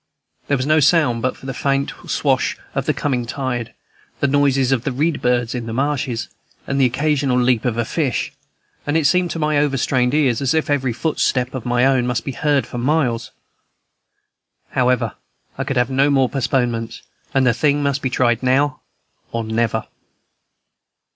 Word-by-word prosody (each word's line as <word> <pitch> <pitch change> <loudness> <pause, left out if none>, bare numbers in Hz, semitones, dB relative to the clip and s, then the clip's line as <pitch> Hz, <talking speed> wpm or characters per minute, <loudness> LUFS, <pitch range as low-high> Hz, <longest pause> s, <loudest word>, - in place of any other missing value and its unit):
There 140 - +2
was 130 - -2
no 155 +2 +4
sound 145 -5 +3
but 130 +2 -2
the 135 0 -5
faint 140 +2 0 0.2
swash - - 0 0.2
of - - -2
the - - +3
coming 125 -5 -1
tide, 125 -3 -3 0.4
the - - +1
noises 135 -2 +2
of 125 -3 +1
the 140 - -1
reed 150 +5 0
birds 120 -1 +1
in 120 -2 -4
the 110 - -4
marshes, 130 -3 -1 0.4
and 140 0 0
the 130 - +5
occasional 140 0 0
leap 125 -2 +2
of 120 -2 0
a 115 - 0
fish; 140 0 -1 0.5
and 145 +2 +2
it 160 - +1
seemed 180 +4 +3
to - - -4
my 150 -2 +1
overstrained 135 -2 +1
ear 145 -4 +3
as 135 +5 0
if 160 -2 0
every 135 -3 +1
footstep 125 -1 0
of 130 -3 -5
my 120 +1 +2
own 130 -2 +2
must 125 -3 -2
be 140 - -2
heard 145 0 +1
for 120 - -6
miles. 125 -3 0 1.4
However, 125 -1 +1 0.4
I - - -3
could 135 - -2
have 120 +1 +1
no 135 +2 +3
more 135 -3 +3
postponements, 120 -4 -1 0.3
and 135 -1 +4
the 120 - +4
thing 145 +4 +1
must 140 -1 0
be 130 - -1
tried 120 -2 +1
now 130 +1 +1 0.5
or 115 0 -2
never. 110 0 -1
130 Hz, 180 wpm, -20 LUFS, 125-145 Hz, 1.4 s, the